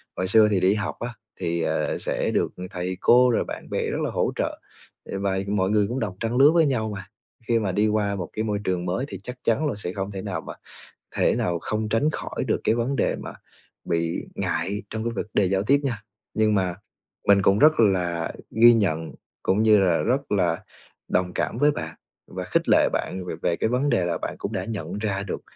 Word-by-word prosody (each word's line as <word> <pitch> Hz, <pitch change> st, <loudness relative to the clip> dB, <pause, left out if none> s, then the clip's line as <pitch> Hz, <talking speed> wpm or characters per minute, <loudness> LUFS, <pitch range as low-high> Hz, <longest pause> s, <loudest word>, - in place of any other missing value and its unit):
Hồi 95 Hz, -, -1 dB
xưa 110 Hz, +2 st, +6 dB
thì 95 Hz, -, +2 dB
đi 95 Hz, +2 st, +4 dB
học 105 Hz, -1 st, -2 dB
á 120 Hz, 0 st, -4 dB, 0.3 s
thì, 85 Hz, -2 st, -1 dB
ờ, -, -, 0 dB
sẽ -, -, -1 dB
được -, -, 0 dB, 0.2 s
thầy 90 Hz, 0 st, -3 dB
cô 125 Hz, 0 st, +6 dB
rồi -, -, +1 dB
bạn -, -, -7 dB
bè -, -, -1 dB
rất -, -, -2 dB
là -, -, -1 dB
hỗ -, -, 0 dB
trợ, -, -, -2 dB, 0.4 s
ừ, 95 Hz, -, -5 dB
vài 95 Hz, 0 st, -1 dB
mọi 100 Hz, -1 st, 0 dB
người 105 Hz, -2 st, +3 dB
cũng 125 Hz, +3 st, -3 dB
đồng 100 Hz, -5 st, -3 dB
trang 115 Hz, +2 st, -1 dB
lứa 145 Hz, +3 st, +7 dB
với 165 Hz, -2 st, +4 dB
nhau 115 Hz, -6 st, 0 dB
mà. 95 Hz, -1 st, -8 dB, 0.4 s
Khi 115 Hz, -1 st, +3 dB
mà 100 Hz, -4 st, -1 dB
đi 105 Hz, +3 st, +2 dB
qua 105 Hz, -1 st, 0 dB
một 90 Hz, -4 st, -5 dB
cái 110 Hz, -, -2 dB
môi 105 Hz, -2 st, -1 dB
trường 90 Hz, -2 st, -1 dB
mới 95 Hz, +10 st, -1 dB
thì 95 Hz, -, -7 dB
chắc 125 Hz, +3 st, -6 dB
chắn 150 Hz, +7 st, +2 dB
là 130 Hz, -, -2 dB
sẽ 95 Hz, -3 st, -5 dB
không 95 Hz, 0 st, -4 dB
thể 95 Hz, -1 st, -5 dB
nào 90 Hz, -6 st, -4 dB
mà -, -, -8 dB, 0.6 s
thể -, -, +3 dB
nào 85 Hz, -1 st, 0 dB
không 110 Hz, 0 st, -2 dB
tránh 115 Hz, +8 st, +2 dB
khỏi -, -, -4 dB
được -, -, 0 dB
cái 110 Hz, -, +3 dB
vấn 120 Hz, +4 st, -1 dB
đề -, -, +1 dB
mà -, -, -8 dB, 0.5 s
bị 85 Hz, 0 st, -1 dB
ngại 100 Hz, +4 st, -2 dB
trong 110 Hz, 0 st, -4 dB
cái 120 Hz, -, 0 dB
vật 100 Hz, -, -3 dB
đề 100 Hz, -, +4 dB
giao 95 Hz, 0 st, +1 dB
tiếp 140 Hz, +6 st, +3 dB
nha. 115 Hz, -6 st, -2 dB, 0.3 s
Nhưng 110 Hz, -1 st, +2 dB
mà 90 Hz, -3 st, +1 dB, 0.5 s
mình 100 Hz, -1 st, +6 dB
cũng 100 Hz, +2 st, +4 dB
rất 155 Hz, -4 st, +5 dB
là 90 Hz, -5 st, +1 dB, 0.2 s
ghi 120 Hz, +1 st, +7 dB
nhận, 80 Hz, -7 st, 0 dB, 0.3 s
cũng 95 Hz, +3 st, +2 dB
như 110 Hz, -2 st, +6 dB
là 90 Hz, -4 st, +3 dB
rất 130 Hz, 0 st, -1 dB
là 90 Hz, -4 st, +1 dB, 0.4 s
đồng 90 Hz, -1 st, 0 dB
cảm -, -, -1 dB
với 145 Hz, +2 st, +5 dB
bạn 80 Hz, -, -5 dB, 0.3 s
và -, -, -6 dB
khích -, -, 0 dB
lệ -, -, +5 dB
bạn 95 Hz, 0 st, -2 dB
về -, -, -4 dB
về 85 Hz, -, +1 dB
cái -, -, 0 dB
vấn 135 Hz, +3 st, +1 dB
đề 110 Hz, -7 st, +2 dB
là 85 Hz, -, -1 dB
bạn -, -, -4 dB
cũng -, -, -4 dB
đã -, -, -2 dB
nhận 100 Hz, -4 st, -5 dB
ra 100 Hz, -2 st, -1 dB
được 100 Hz, -, -5 dB
100 Hz, 235 wpm, -24 LUFS, 95-115 Hz, 0.6 s, lứa